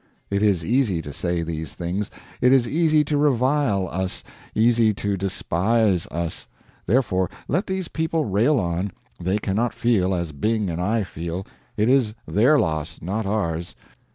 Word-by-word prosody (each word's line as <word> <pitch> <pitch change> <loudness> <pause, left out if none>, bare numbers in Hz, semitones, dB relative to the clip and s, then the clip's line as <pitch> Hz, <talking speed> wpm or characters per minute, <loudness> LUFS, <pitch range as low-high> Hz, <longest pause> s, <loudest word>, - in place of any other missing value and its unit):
It 100 0 +1
is 95 -6 +2
easy 115 -6 +2
to 75 - -7
say 85 +2 -1
these 80 -2 -5
things; 90 +4 -3 0.3
it 125 - +5
is 130 -3 +4
easy 155 0 +3
to 150 0 0
revile 130 -7 +2
us, 95 0 -3 0.3
easy 115 -1 +4
to 100 +1 -1
despise 95 +1 +1
us; 85 0 -4 0.4
therefore, 95 -5 +2 0.2
let 180 +8 0
these 190 -2 -2
people 160 -1 -1
rail 120 +8 +3
on; 90 +1 -1 0.3
they 95 +3 0
cannot 105 +4 -1
feel 95 -6 +2
as 85 -2 -2
Byng 105 +6 0
and 85 +1 -3
I 110 +4 +1
feel 85 +1 -5 0.3
it 105 - +2
is 125 -5 +3
their 110 - +4
loss, 80 - -1
not 100 +5 -3
ours. 85 -5 -2
100 Hz, 155 wpm, -23 LUFS, 90-120 Hz, 0.4 s, it